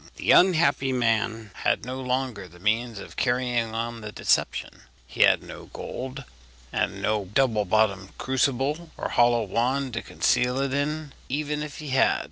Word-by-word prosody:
The - - +1
unhappy 170 -7 +4
man 115 -3 0
had - - +1
no 130 +1 -5
longer 125 -6 -2
the 90 0 -17
means 110 +3 0
of 100 - -9
carrying 120 -3 0
on 115 0 -3
the 105 -1 -7
deception; - - 0 0.2
he - - -4
had - - +5
no - - -10
gold, 130 +2 -6 0.5
and - - -1
no 105 -2 0
double 110 +1 +1
bottomed 100 -1 +1
crucible 135 +5 0
or - - -3
hollow 120 -1 +3
wand 125 +6 0
to 115 - -2
conceal 125 +1 +1
it 135 -1 -1
in, 150 +1 -2 0.2
even 150 +2 -2
if 150 -1 -6
he 150 -2 -7
had. 130 0 +3
125 Hz, 160 wpm, -26 LUFS, 110-135 Hz, 0.5 s, had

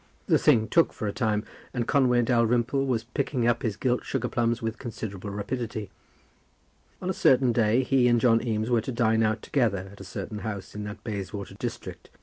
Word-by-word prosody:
The - - +3
thing 110 -1 +4
took 165 +6 +3
for 110 - -4
a 100 - -2
time, 110 -4 0 0.3
and 120 -2 -1
Conway 125 -4 +3
Dalrymple 120 +3 +2
was 120 -4 0
picking 125 0 -1
up 120 0 +2
his 110 -4 -1
gilt 125 -1 0
sugar 125 -2 -2
plums 120 -1 0
with 115 -2 -4
considerable 105 -5 -6
rapidity. 110 0 -4 1.1
On 180 - -2
a - - -2
certain 130 -6 +4
day 115 +2 +3
he 130 -1 +3
and 120 -1 +4
John 115 -2 +4
Eames 110 0 -1
were 120 -2 +3
to 125 - -5
dine 115 -2 +2
out 110 0 0
together 100 -9 0
at 100 - -13
a - - -7
certain 105 -1 -6
house 105 -2 -6
in 105 0 -5
that 105 0 -8
Bayswater 100 -2 -5
district. - - -6
115 Hz, 195 wpm, -27 LUFS, 110-125 Hz, 1.1 s, thing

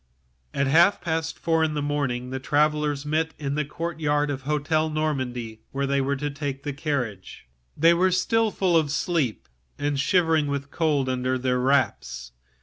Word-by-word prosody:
At 140 - 0
half 170 +8 +5
past 160 -1 -2
four 160 -1 +1
in 155 -1 0
the - - -1
morning 135 -4 -2
the 130 - -3
travellers 150 0 +1
met 155 +2 -1
in 140 -2 -3
the 150 +1 0
courtyard 150 -1 -1
of 135 - -3
the 130 - -21
Hotel 150 +2 +1
de 155 - -6
Normandie, 125 -7 -2
where 140 0 -1
they 140 0 +1
were 140 +1 0
to 145 +2 -3
take 140 -1 -5
their 145 - -3
seats 145 - -18
in - - +2
the 110 -3 -6
coach. 95 - -13 0.3
They 165 +3 +6
were 185 +2 +3
still 225 +5 +2
half 200 - -10 0.2
asleep, 145 -4 -1 0.3
and 145 -1 -1
shivering 160 0 +2
with 140 0 -3
cold 150 -5 +1
under 130 0 0
their 125 0 0
wraps. 65 - 0
145 Hz, 190 wpm, -25 LUFS, 135-160 Hz, 0.3 s, They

